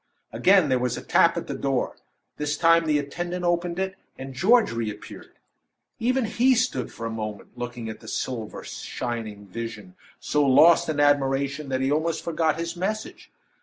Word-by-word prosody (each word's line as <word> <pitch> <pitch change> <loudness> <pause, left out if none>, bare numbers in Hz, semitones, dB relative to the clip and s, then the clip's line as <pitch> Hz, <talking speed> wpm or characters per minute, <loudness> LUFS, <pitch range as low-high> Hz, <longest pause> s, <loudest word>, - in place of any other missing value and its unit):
Again 190 -5 +4
there 130 -1 +2
was 125 -1 -1
a - - -7
tap - - +3
at - - -3
the - - -5
door. - - -1 0.4
This 150 0 -2
time 165 0 +4
the 150 -1 +3
attendant 175 +5 -4
opened 175 0 0
it, 190 0 -1 0.2
and 135 0 -7
George 215 - +4
reappeared. 110 -3 -6 0.6
Even 255 +2 +1
he 255 +4 +3
stood 225 - -1
for 115 - -7
a 115 - -3
moment 110 -2 -6
looking 120 -1 -6
at 110 - -7
the - - -14
silver 115 -4 -4
shining 110 -4 -5
vision, 115 +4 -6
and 185 - -18 0.3
so 150 0 +1
lost 160 +5 +6
in 150 -2 -1
admiration, 140 0 +1
that 130 0 -1
he 135 +1 +1
almost 160 +2 0
forgot 160 -2 0
his 170 +1 -4
message. 215 - -4
150 Hz, 175 wpm, -25 LUFS, 125-175 Hz, 0.6 s, lost